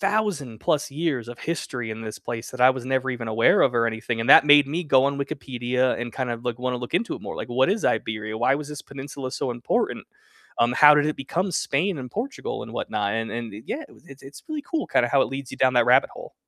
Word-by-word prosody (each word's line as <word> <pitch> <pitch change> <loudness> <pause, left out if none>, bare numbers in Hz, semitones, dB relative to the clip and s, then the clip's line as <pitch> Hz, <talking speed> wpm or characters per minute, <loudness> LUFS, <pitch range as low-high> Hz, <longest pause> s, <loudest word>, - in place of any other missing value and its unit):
thousand 195 - -1
plus 150 -1 0
years 140 -6 -2
of 120 - -9
history 125 -8 -4
in 110 +1 -6
this 110 -1 -7
place 115 -1 -6
that 130 - -9
I 130 - +8
was 130 -2 -4
never 130 0 0
even 120 -2 -5
aware 110 +1 +4
of 125 -3 +2
or 115 0 +3
anything, 115 0 -3
and 120 +5 0
that - - +9
made 145 -1 +7
me 165 +5 -3
go 135 -3 +4
on 140 0 -1
Wikipedia 130 -3 -1
and 120 -1 -5
kind 130 -2 -3
of 115 +1 -5
look 120 -1 -1
like, - - -14
wanna 125 0 -1
look 120 +4 -7
into 215 +6 0
it - - -13
more, - - -6
like, 110 - -5
what 130 +4 +2
is 215 +1 -1
Iberia? 110 0 -1
Why 125 +3 +3
was 150 -1 -6
this 150 -1 -7
peninsula 135 -1 -7
so 130 - -2
important? 120 0 -2 0.5
Um, 120 +1 +3
how 150 +3 +8
did 150 0 +3
it 155 - -2
become 175 +8 -2
Spain, 155 +5 0
and 125 -1 -7
Portugal, 410 - -4
and - - -9
whatnot? 100 -1 -2
And 115 -1 -2
and 115 -2 -5
yeah, 305 - -4
it - - -19
it's 140 0 -14
it's 135 +1 -12
really 305 -2 -4
cool 310 +2 -3
kinda 120 - +2
how 135 +2 +3
it - - -1
leads 135 -1 -6
you - - -8
down 130 -1 +3
that 120 - +5
rabbit - - +5
hole. - - -11
130 Hz, 260 wpm, -24 LUFS, 120-150 Hz, 0.5 s, that